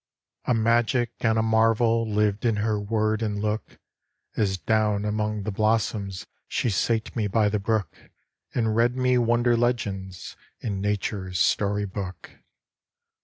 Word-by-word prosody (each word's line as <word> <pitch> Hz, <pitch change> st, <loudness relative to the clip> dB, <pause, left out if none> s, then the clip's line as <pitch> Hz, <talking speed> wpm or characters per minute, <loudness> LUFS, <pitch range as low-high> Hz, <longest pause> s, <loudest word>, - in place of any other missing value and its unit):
A 125 Hz, -, +2 dB
magic 115 Hz, +1 st, +2 dB
and 110 Hz, -1 st, +2 dB
a 110 Hz, -, +2 dB
marvel 115 Hz, 0 st, +2 dB
Lived 105 Hz, -1 st, +1 dB
in 115 Hz, -3 st, +2 dB
her 105 Hz, 0 st, 0 dB
word 110 Hz, +1 st, 0 dB
and 105 Hz, -2 st, -1 dB
look, 105 Hz, +1 st, -3 dB, 0.6 s
As 95 Hz, -3 st, +1 dB
down 105 Hz, +3 st, +1 dB
among 105 Hz, 0 st, -1 dB
the 105 Hz, -, -2 dB
blossoms 105 Hz, -2 st, 0 dB, 0.2 s
She 120 Hz, -, 0 dB
sate 110 Hz, +3 st, 0 dB
me 110 Hz, -3 st, 0 dB
by 105 Hz, +1 st, +2 dB
the 105 Hz, 0 st, 0 dB
brook, 100 Hz, -4 st, -1 dB, 0.6 s
And 110 Hz, -3 st, +1 dB
read 120 Hz, +2 st, +3 dB
me 125 Hz, -1 st, +3 dB
wonder 120 Hz, 0 st, +3 dB
legends 100 Hz, -6 st, -2 dB, 0.2 s
In 100 Hz, -4 st, -3 dB
Nature's 100 Hz, -2 st, -2 dB
Story 105 Hz, +3 st, +2 dB
Book. 95 Hz, -2 st, -7 dB
110 Hz, 140 wpm, -25 LUFS, 100-115 Hz, 0.6 s, read